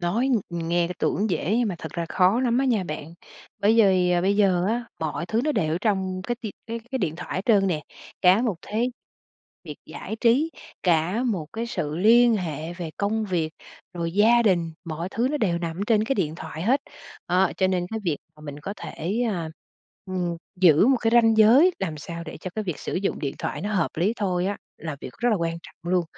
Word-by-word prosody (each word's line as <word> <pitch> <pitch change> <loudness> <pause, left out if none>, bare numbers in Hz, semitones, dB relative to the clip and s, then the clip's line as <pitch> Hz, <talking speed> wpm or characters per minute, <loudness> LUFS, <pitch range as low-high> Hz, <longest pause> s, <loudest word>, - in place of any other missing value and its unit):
Nói 215 +10 +1
ng 175 -9 -1
nghe 170 0 +2
cái 180 - -5
tưởng 210 0 0
dễ 175 +4 0
nhưng 240 -3 +1
mà 190 - -2
thật 160 - -7
ra 170 -1 -3
khó 190 +8 +3
lắm 245 -1 +2
á 270 - +2
nha 225 -7 +1
bạn, 155 0 -6 0.4
bởi 210 +2 +3
vì 185 -4 +4
bây 200 +2 +2
giờ 185 -4 +3
á, 235 +2 -1
mọi 160 +2 -3
thứ 220 +3 +1
nó 305 - +1
đều 155 - 0
ở 170 - -1
trong 190 -4 0
cái 240 +6 -2
ti 215 -4 -5
cái 230 0 -4
cái 265 - 0
điện 160 -8 -1
thoại 180 - -6
hết 185 - -3
trơn 205 -4 +4
nè. 160 -5 -1 0.4
Cả 190 +6 +6
một 220 -8 0
thế 230 +4 -1 0.7
việc - - -7
giải 220 - -6
trí, 260 +8 +3 0.3
cả 175 +5 +2
một 185 -10 -1
cái 230 +1 -3
sự 155 -9 -3
liên 230 +5 +5
hệ 160 -3 -4
về 175 -2 -6
công 215 +2 0
việc, 170 -5 -1 0.4
rồi 170 -1 -3
gia 225 +5 +5
đình, 175 -6 +2
mọi 165 +2 -4
thứ 235 +5 0
nó 300 - 0
đều 185 -10 +1
nằm 165 -1 -4
ở 195 - -3
trên 215 -2 +3
cái 270 +4 0
điện 160 - -1
thoại 160 -1 -7
hết. 255 +9 +3 0.5
Đó, 180 +1 +3
cho 190 - +3
nên 180 -2 0
cái 220 0 -3
việc 165 -5 +1 0.2
mà - - -17
mình 145 -1 -8
có 195 +7 -5
thể, 190 +9 -3
ơ, 170 -5 -3 0.6
ừm, 180 -2 -2 0.2
giữ 180 0 +6
một 265 0 +5
cái 225 - +2
ranh 225 -1 +5
giới 245 +12 +7
làm 165 -5 -3
sao 170 +2 -7
để - - -8
cho 185 - -5
cái 215 - -2
việc 175 -7 -3
sử - - -5
dụng 195 +2 -1
điện 140 -2 -3
thoại - - -3
nó 210 +1 -2
hợp 180 -5 +1
lý 180 +7 +2
thôi 185 -4 0
á 200 +1 -1 0.2
là 155 -3 -5
việc - - -8
rất 240 +4 +1
là 215 - +3
quan 165 -2 -2
trọng 175 +2 -7
luôn. 180 -1 +3
185 Hz, 235 wpm, -25 LUFS, 170-220 Hz, 0.7 s, giới